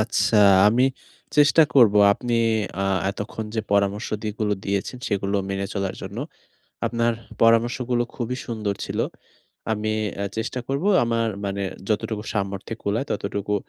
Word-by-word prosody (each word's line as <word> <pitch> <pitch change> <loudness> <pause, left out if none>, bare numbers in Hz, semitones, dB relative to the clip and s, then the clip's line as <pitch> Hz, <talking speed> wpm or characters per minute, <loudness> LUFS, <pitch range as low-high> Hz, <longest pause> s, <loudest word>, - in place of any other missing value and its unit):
আচ্ছা, 110 0 +1 0.3
আমি 125 +4 +3 0.5
চেষ্টা 150 +2 +6
করব 115 -6 +6 0.2
আপনি 120 +2 -3 0.5
আ - - 0 0.3
এতক্ষণ 105 +2 -5
যে 110 - +1
পরামর্শ 100 +2 +1 0.2
যেগুলো 105 0 -1
দিয়েছেন 100 +5 -2
সেগুলো 100 0 0
মেনে 95 0 -2
চলার 95 -2 -2
জন্য। - - -6 0.7
আপনার 115 0 +1 0.3
পরামর্শগুলো 120 +2 +3
খুবই 125 +1 -3
সুন্দর 110 -4 -2
ছিল। - - -5 0.7
আমি 110 0 -1 0.3
এ - - -1
চেষ্টা 120 +3 -2
করব 140 +6 -1 0.2
আমার 115 -1 0 0.2
মানে 100 0 -2 0.3
যতটুকু 105 0 -1
সামর্থ্যে 100 +2 -3
কুলায় 110 +7 -1
ততটুকু 100 0 -2
110 Hz, 130 wpm, -23 LUFS, 100-120 Hz, 0.7 s, চেষ্টা